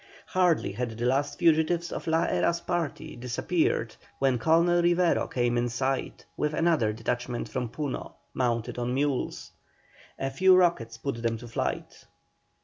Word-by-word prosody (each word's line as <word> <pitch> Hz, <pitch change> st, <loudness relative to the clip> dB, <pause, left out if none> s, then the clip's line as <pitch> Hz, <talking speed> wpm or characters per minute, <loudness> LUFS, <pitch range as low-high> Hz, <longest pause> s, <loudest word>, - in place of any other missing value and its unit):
Hardly 180 Hz, -3 st, +2 dB
had 125 Hz, -1 st, -3 dB
the 120 Hz, -, -2 dB
last 135 Hz, +3 st, +1 dB
fugitives 170 Hz, 0 st, +2 dB
of -, -, -5 dB
La 160 Hz, 0 st, +2 dB
Hera's 170 Hz, 0 st, +1 dB
party 170 Hz, -5 st, -3 dB
disappeared 125 Hz, 0 st, -1 dB, 0.2 s
when 135 Hz, -3 st, +2 dB
Colonel 170 Hz, +6 st, +4 dB
Rivero 175 Hz, 0 st, +2 dB
came 120 Hz, -1 st, 0 dB
in 120 Hz, 0 st, 0 dB
sight, 130 Hz, +2 st, -2 dB
with 150 Hz, 0 st, -1 dB
another 160 Hz, -10 st, +2 dB
detachment 120 Hz, +2 st, -3 dB
from 125 Hz, -2 st, -3 dB
Puno, 145 Hz, +1 st, -4 dB, 0.2 s
mounted 120 Hz, -2 st, -1 dB
on 120 Hz, +1 st, -1 dB
mules. 140 Hz, -1 st, -1 dB, 0.7 s
A 135 Hz, 0 st, -2 dB
few 185 Hz, +7 st, +5 dB
rockets 170 Hz, -11 st, +2 dB
put 115 Hz, -1 st, -4 dB
them 115 Hz, -1 st, 0 dB
to 120 Hz, +2 st, -10 dB
flight. 115 Hz, -, -4 dB
135 Hz, 145 wpm, -27 LUFS, 120-170 Hz, 0.7 s, few